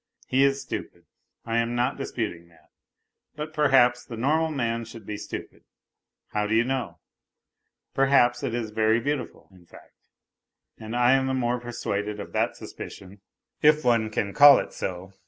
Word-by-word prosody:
He 135 +2 +2
is 140 0 +2
stupid. - - -7 0.4
I 115 0 0
am 115 +1 -1
not 120 +1 0
disputing 105 -11 -5
that, 85 -1 -25 0.6
but 150 +1 -6
perhaps 130 -5 +3
the 120 -1 -9
normal 155 +7 +1
man 115 -6 -2
should 115 -2 -11
be 105 - -5
stupid, - - -8 0.7
how 105 0 -1
do 110 - 0
you 115 - +4
know? 130 0 -3 1.0
Perhaps 135 -3 +3
it 115 - -2
is 115 -3 -3
very 110 +1 +2
beautiful, 145 +2 -4
in 90 -2 -20
fact. - - -17 0.9
And 110 +1 -6
I 120 +1 +4
am 135 0 +2
the 130 - 0
more 125 -1 0
persuaded 105 -4 -4
of 100 - -8
that - - 0
suspicion, 95 +1 -10 0.4
if 150 -1 +4
one 115 -3 +2
can 100 -2 -2
call 145 0 +9
it - - -4
so. 95 +1 -5
120 Hz, 165 wpm, -25 LUFS, 110-135 Hz, 1.0 s, call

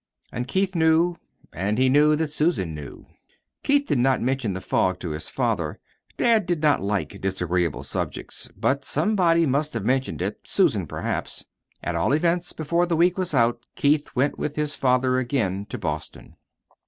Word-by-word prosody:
And 125 +1 -4
Keith 190 +6 0
knew. 165 +1 +3 0.4
And 100 +5 -1
he 130 +1 +4
knew 150 +3 +5
that 155 -1 -2
Susan 150 - 0
knew. 75 -2 -9 0.6
Keith 285 0 +2
did 140 - 0
not 130 +1 +3
mention 130 -4 -1
the 95 - -4
fog 95 0 0
to 85 - -4
his 75 +1 -5
father - - -1 0.4
dad 225 -5 +3
did 175 -2 0
not 150 -2 +4
like 100 -6 -2
disagreeable 90 -3 -1
subjects. - - -4
But 140 +1 0
somebody 170 0 +2
must 145 0 0
have 105 -4 -3
mentioned 130 +2 0
it - - -3
Susan, - - +1
perhaps. - - -4 0.4
At 90 - -2
all 85 +10 +1
events, 170 +3 +1
before 170 +3 0
the 170 -2 0
week 175 +2 +4
was 185 -5 -2
out 120 -1 +2
Keith 145 +1 +2
went 135 +3 +1
with 150 - -3
his 150 -1 -1
father 130 0 +2
again 105 -7 -1
to - - -4
Boston. - - -6
140 Hz, 170 wpm, -24 LUFS, 105-165 Hz, 0.6 s, knew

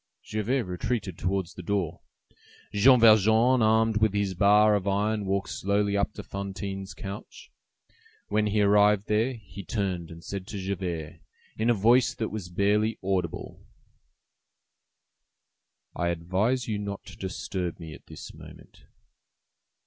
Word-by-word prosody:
Javert 115 +5 -1
retreated 95 +1 -3
towards 95 -1 -2
the 90 - -9
door. 90 -2 -2 0.7
Jean 125 +5 +6
Valjean, 110 +3 +5
armed 110 0 +3
with 110 -2 +2
his 100 -2 0
bar 105 +3 +5
of 100 -1 0
iron, 105 +1 0
walked 95 0 -1
slowly 100 +1 0
up 100 +1 +1
to 105 - -8
Fantine's 95 0 -6
couch. 100 +1 -9 0.8
When 105 0 +1
he 105 0 +2
arrived 105 0 +4
there 110 +5 +1
he 100 -2 -11
turned 95 -5 -3
and 85 0 -11
said 100 0 -6
to 105 - -6
Javert, 90 -5 -4 0.4
in 110 +2 0
a 120 - +4
voice 120 +5 +4
that 110 - -3
was 100 -5 -6
barely 105 +4 +1
audible:— 95 -3 -3 2.3
"I 85 - -1
advise 95 +9 0
you 105 -2 -2
not 100 -1 -5
to - - -11
disturb 95 -2 -4
me 80 -2 -8
at - - -15
this - - -10
moment." - - -15
100 Hz, 140 wpm, -27 LUFS, 95-110 Hz, 2.3 s, Jean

